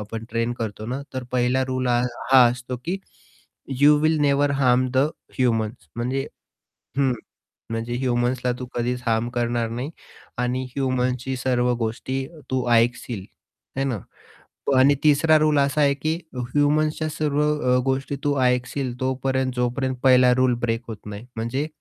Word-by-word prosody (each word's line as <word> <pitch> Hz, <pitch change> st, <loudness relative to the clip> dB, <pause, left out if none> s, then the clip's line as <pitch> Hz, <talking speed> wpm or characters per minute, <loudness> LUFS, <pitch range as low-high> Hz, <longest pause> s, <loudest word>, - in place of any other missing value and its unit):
आपण 110 Hz, +2 st, -6 dB
ट्रेन 115 Hz, +1 st, 0 dB
करतो 110 Hz, -1 st, -4 dB
ना, 130 Hz, +4 st, -3 dB
तर 130 Hz, -, -3 dB
पहिला 125 Hz, +1 st, +2 dB
रूल 130 Hz, 0 st, -1 dB
ह 120 Hz, 0 st, +3 dB, 0.3 s
हा 130 Hz, -2 st, +9 dB
असतो, 125 Hz, +1 st, -5 dB
की 185 Hz, +3 st, -1 dB, 0.8 s
you 150 Hz, +1 st, +7 dB
will 155 Hz, +1 st, +3 dB
never 145 Hz, 0 st, +3 dB
harm 130 Hz, -2 st, +3 dB
the 130 Hz, -, +3 dB, 0.4 s
humans 115 Hz, -7 st, 0 dB
म्हणजे 130 Hz, +3 st, -1 dB, 0.7 s
हं. 135 Hz, -2 st, +3 dB, 0.6 s
म्हणजे 115 Hz, +1 st, -3 dB
ह्युमन्सला 125 Hz, 0 st, 0 dB
तू 125 Hz, -, -5 dB
कधीच 125 Hz, +1 st, -1 dB
हार्म 115 Hz, +1 st, +1 dB
करणार 120 Hz, -1 st, 0 dB
नाही 125 Hz, +5 st, -4 dB, 0.5 s
आणि 125 Hz, +1 st, 0 dB
ह्युमन्सची 130 Hz, -1 st, 0 dB
सर्व 125 Hz, -1 st, +1 dB
गोष्टी 130 Hz, +4 st, -2 dB, 0.2 s
तू 130 Hz, -1 st, 0 dB
ऐकशील 115 Hz, -3 st, +1 dB, 0.5 s
है 135 Hz, -, +1 dB
ना. 125 Hz, -6 st, -1 dB, 0.7 s
प 140 Hz, -, +3 dB
आणि 140 Hz, +2 st, +6 dB
3रा 155 Hz, +1 st, +5 dB
रूल 150 Hz, -1 st, +3 dB
असा 140 Hz, +2 st, +2 dB
आहे, 140 Hz, -1 st, +4 dB
की 155 Hz, +3 st, -1 dB, 0.2 s
ह्युमन्सच्या 145 Hz, +5 st, +1 dB
सर्व 150 Hz, -1 st, 0 dB, 0.3 s
अ, -, -, +4 dB
गोष्टी 135 Hz, +1 st, -1 dB
तू 145 Hz, -1 st, +1 dB
ऐकशील 125 Hz, +1 st, 0 dB
तोपर्यंत 130 Hz, 0 st, 0 dB
जोपर्यंत 130 Hz, +1 st, -1 dB
1ला 125 Hz, -1 st, +6 dB
रूल 130 Hz, -1 st, +3 dB
ब्रेक 115 Hz, -1 st, 0 dB
होत 110 Hz, -, -5 dB
नाही 105 Hz, +2 st, -7 dB
म्हणजे, 130 Hz, +6 st, -2 dB
130 Hz, 150 wpm, -23 LUFS, 120-135 Hz, 0.8 s, हा